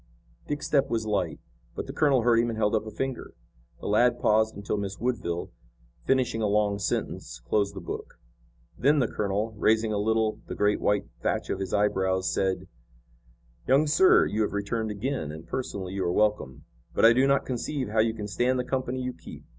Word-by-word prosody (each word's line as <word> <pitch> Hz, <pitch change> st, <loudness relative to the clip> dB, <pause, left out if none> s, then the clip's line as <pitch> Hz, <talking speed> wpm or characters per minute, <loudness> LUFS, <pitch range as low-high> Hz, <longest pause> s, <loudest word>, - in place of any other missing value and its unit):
Dick's 145 Hz, 0 st, -3 dB
step 140 Hz, -2 st, +2 dB
was 115 Hz, -1 st, -1 dB
light, 95 Hz, -6 st, -1 dB, 0.4 s
but -, -, -4 dB
the -, -, -7 dB
colonel 140 Hz, -6 st, +3 dB
heard 115 Hz, -1 st, +4 dB
him 120 Hz, 0 st, +1 dB
and 115 Hz, -, -4 dB
held 105 Hz, -1 st, +1 dB
up 110 Hz, 0 st, 0 dB
a -, -, -3 dB
finger. 135 Hz, +4 st, -5 dB, 0.5 s
The -, -, -9 dB
lad 120 Hz, +4 st, +3 dB
paused 110 Hz, +1 st, +2 dB
until 100 Hz, +1 st, -3 dB
Miss 100 Hz, -1 st, -4 dB
Woodville, 105 Hz, -8 st, -2 dB, 0.5 s
finishing 130 Hz, -4 st, +1 dB
a 105 Hz, -, +2 dB
long 105 Hz, -1 st, +1 dB
sentence, 60 Hz, -9 st, -3 dB
closed 100 Hz, -, 0 dB
the 95 Hz, -, -6 dB
book. 85 Hz, -, -7 dB, 0.6 s
Then 145 Hz, +4 st, +3 dB
the 125 Hz, -5 st, +2 dB
colonel, 105 Hz, +2 st, -2 dB
raising 110 Hz, +1 st, +2 dB
a 105 Hz, -, 0 dB
little 110 Hz, +1 st, +1 dB
the -, -, -5 dB
great 105 Hz, 0 st, +1 dB
white 105 Hz, 0 st, +1 dB, 0.2 s
thatch -, -, -1 dB
of -, -, -2 dB
his 95 Hz, -2 st, -4 dB
eyebrows, 95 Hz, -2 st, +1 dB
said: 95 Hz, -1 st, -1 dB, 1.0 s
"Young 140 Hz, +3 st, +4 dB
sir, 160 Hz, +5 st, +5 dB
you 110 Hz, -, -1 dB
have 105 Hz, -, 0 dB
returned 110 Hz, +2 st, -2 dB
again, 105 Hz, -, -3 dB
and, 80 Hz, +1 st, -9 dB
personally, 95 Hz, -8 st, -4 dB
you 95 Hz, -1 st, -2 dB
are 85 Hz, -, 0 dB
welcome, 105 Hz, -11 st, 0 dB, 0.3 s
but -, -, +4 dB
I 115 Hz, -, +8 dB
do 130 Hz, +3 st, +3 dB
not 140 Hz, 0 st, +2 dB
conceive 130 Hz, 0 st, -3 dB
how 110 Hz, +1 st, 0 dB
you 110 Hz, 0 st, +2 dB
can 105 Hz, -2 st, -5 dB
stand 120 Hz, +6 st, +1 dB
the 125 Hz, -, 0 dB
company 130 Hz, 0 st, -2 dB
you 125 Hz, 0 st, -3 dB
keep. -, -, -12 dB
110 Hz, 200 wpm, -27 LUFS, 100-125 Hz, 1.0 s, I